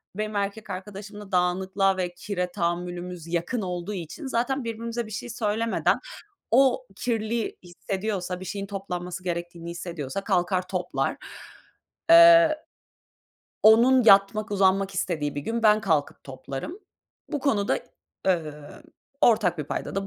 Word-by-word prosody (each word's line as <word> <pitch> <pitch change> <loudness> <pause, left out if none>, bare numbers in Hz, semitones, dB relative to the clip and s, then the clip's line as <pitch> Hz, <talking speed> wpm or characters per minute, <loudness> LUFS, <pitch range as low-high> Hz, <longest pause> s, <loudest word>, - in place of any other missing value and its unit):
benim 215 0 -3
erkek 200 +2 -3
arkadaşımla 205 +2 -8
dağınıklığa 190 +2 +1
ve 180 -1 -2
kire 180 -1 -3
tahammülümüz 175 -1 -3
yakın 175 +8 -1
olduğu 180 +1 -4
için 185 - -6
zaten 260 +2 -1
birbirimize 230 +1 -4
bir - - -11
şey 225 +3 -5
söylemeden 225 0 0 0.5
o 260 +1 +4
kirli 230 -1 -2
hissediyorsa, 185 +1 -4
bir 185 - -8
şeyin 200 0 -4
toplanması 180 -2 -5
gerektiğini 170 -1 -4
hissediyorsa 170 -1 -5
kalkar 185 -1 0
toplar. 180 -2 -2 0.9
Eee, 335 -2 +8 1.1
onun 235 +3 +6
yatmak, 205 +1 +5
uzanmak 195 0 +2
istediği 155 -6 -2
bir 145 - -3
gün 230 +8 -3
ben 215 0 +6
kalkıp 160 -8 -1
toplarım. 135 - -7 0.5
Bu 295 -4 -3
konuda, 215 -8 +1 0.5
eee, 180 -3 +3 0.8
ortak 210 -7 +3
bir 150 - -2
paydada 195 +6 -4
195 Hz, 125 wpm, -26 LUFS, 180-220 Hz, 1.1 s, Eee